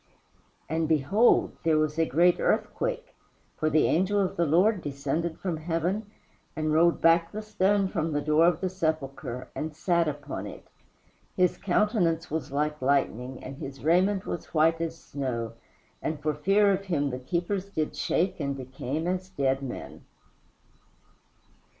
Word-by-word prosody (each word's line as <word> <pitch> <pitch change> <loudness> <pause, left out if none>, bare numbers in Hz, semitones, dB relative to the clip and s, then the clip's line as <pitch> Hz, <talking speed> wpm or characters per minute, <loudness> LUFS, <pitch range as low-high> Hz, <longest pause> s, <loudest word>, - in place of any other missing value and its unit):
"And, 160 0 0
behold, 165 - +3
there 160 -1 +3
was 155 +1 0
a 165 - +3
great 175 +2 +3
earthquake, - - -1 0.4
for 155 - 0
the 155 0 +3
angel 190 +5 +2
of 190 -2 0
the 170 -1 +1
Lord 185 +6 +3
descended 145 +4 -2
from 175 -4 -3
heaven, 175 +6 -2 0.5
and 155 -1 0
rolled 170 +2 +4
back 165 0 +4
the 215 +1 -5
stone 205 -1 +2
from 165 -4 -2
the 145 -1 0
door 155 +2 +4
of 175 -1 +1
the 185 - 0
sepulchre, 140 -7 -3
and 155 -1 -4
sat 170 +1 +1
upon 145 -1 -4
it. - - -10 0.7
His 180 -1 +3
countenance 175 -5 +1
was 155 -3 -3
like 150 +1 -1
lightning, 130 -2 0
and 135 +1 -8
his 135 -4 -8
raiment 185 +5 +3
was 175 - -6
white 165 +1 +3
as 165 0 -3
snow, 125 -7 -4 0.5
and 155 -1 -3
for 150 +1 -1
fear 195 +7 +3
of 195 0 -1
him 145 -7 0
the 125 - -4
keepers 180 +8 -2
did 155 -6 -2
shake 180 +2 0
and 140 -2 -2
became 135 +4 -4
as 185 +1 -2
dead 135 -6 0
men." 130 -3 -7
160 Hz, 155 wpm, -27 LUFS, 145-185 Hz, 0.7 s, rolled